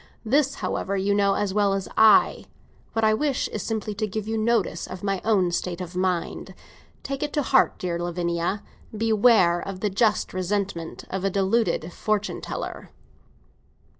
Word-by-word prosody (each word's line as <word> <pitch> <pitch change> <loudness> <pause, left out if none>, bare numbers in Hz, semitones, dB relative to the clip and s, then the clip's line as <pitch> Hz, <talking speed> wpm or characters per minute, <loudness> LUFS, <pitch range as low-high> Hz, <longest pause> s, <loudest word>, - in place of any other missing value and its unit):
This, 275 +4 +2
however, 200 +1 -2
you 195 +1 +1
know 200 -1 +3
as 205 -2 -1
well 205 -1 +2
as 195 -1 -2
I. 220 -1 +5 0.5
What 225 -1 +1
I 215 - +4
wish 280 +3 0
is 215 - -4
simply 215 0 -3
to 215 +1 -2
give 215 +1 -4
you 225 - -1
notice 225 -1 0
of 185 0 -8
my 195 -2 -1
own 195 -5 +2
state 175 0 -2
of 180 -1 -7
mind! 180 -2 -2 0.5
Take 275 0 -4
it 295 - -2
to 295 - +1
heart, 265 0 +3
dear 175 -2 -3
Lavinia. 175 +2 -2 0.3
Beware 215 -5 +4
of 195 -1 -6
the 210 +1 -1
just 215 +2 +1
resentment 185 -2 -3
of 190 0 -3
a 195 - +2
deluded 195 -3 0
fortune 210 -1 -1
hunter!" - - -6
200 Hz, 165 wpm, -25 LUFS, 185-220 Hz, 0.5 s, I